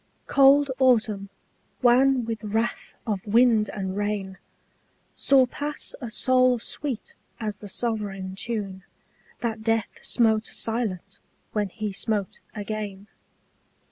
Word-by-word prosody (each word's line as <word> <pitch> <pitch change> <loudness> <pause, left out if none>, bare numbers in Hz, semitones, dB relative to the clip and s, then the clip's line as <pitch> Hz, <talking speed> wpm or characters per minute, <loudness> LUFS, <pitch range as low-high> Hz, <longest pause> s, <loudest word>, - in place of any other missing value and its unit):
Cold 280 0 +5
autumn, 220 -6 +3 0.5
wan 255 0 +5
with 225 -1 -4
wrath 225 +3 -2
of 210 -3 -3
wind 225 -1 +4
and 190 -2 -4
rain, 205 -2 -2 0.8
Saw 270 -2 +5
pass 290 +4 -3
a 240 - -4
soul 255 +2 +3
sweet 255 +1 -4 0.3
as 210 -3 -3
the 205 - -9
sovereign 200 -5 -2
tune 200 -2 -4 0.6
That 225 -2 -2
death 225 0 -1
smote 220 -2 +2
silent 210 -5 -2 0.3
when 210 -2 -1
he 210 +1 -4
smote 205 -1 -2 0.2
again. 210 -1 -5
220 Hz, 110 wpm, -25 LUFS, 205-245 Hz, 0.8 s, Cold